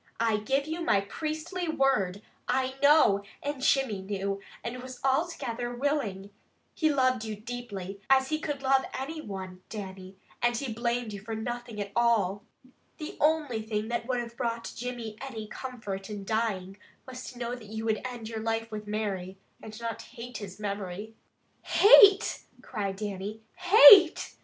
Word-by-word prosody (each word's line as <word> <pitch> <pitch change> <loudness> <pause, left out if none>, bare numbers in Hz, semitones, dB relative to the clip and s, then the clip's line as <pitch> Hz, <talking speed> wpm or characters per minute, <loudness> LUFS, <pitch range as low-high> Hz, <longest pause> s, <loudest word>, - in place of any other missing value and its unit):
"I 225 -2 +2
give 270 +7 0
you 320 +3 -4
my 200 -12 +3
priestly 315 - -4
word, 240 - +1 0.2
I 260 0 0
know, 285 -9 +6 0.2
and 285 -2 -3
Jimmy 265 -7 +2
knew, 195 0 -3 0.2
and 245 +2 -5
was 255 0 -9
altogether 260 -5 -1
willing. 240 -8 -2 0.4
He 315 -2 +2
loved 255 -4 +2
you 220 -1 -4
deeply, 205 -4 -7
as 265 0 +4
he 310 0 0
could 290 -3 -4
love 265 0 +4 0.2
any 310 +4 -5
one, 190 -5 -7
Dannie, 190 -2 -8 0.2
and 240 0 +2
he 250 -3 -3
blamed 235 -1 -2
you 200 - -6
for 220 +2 -5
nothing 240 0 -5
at 200 -1 -4
all. 210 -5 +2 0.5
The 305 - -7
only 300 -7 +2
thing 215 0 -3
that 235 0 -2
would 250 -2 0
have 235 -1 -6
brought 235 -2 -3
Jimmy 235 -2 -5
any 240 -5 -6
comfort 210 -5 -6
in 205 -2 -6
dying, 200 -3 -1 0.3
was 255 0 -8
to 250 - -9
know 240 0 -3
that 240 -4 -9
you 220 +1 -5
would 220 -1 0
end 245 -3 -6
your 225 0 -5
life 225 0 -2
with 210 -1 -6
Mary, 195 -3 -3 0.2
and 215 0 -9
not 230 -1 -4
hate 245 -1 -9
his 200 -2 -8
memory." 200 +1 -5 0.5
"Hate!" 405 -1 +7 0.2
cried 200 -2 -3
Dannie. 205 +1 -5
"Hate! 365 -1 +8
230 Hz, 160 wpm, -28 LUFS, 205-265 Hz, 0.5 s, Hate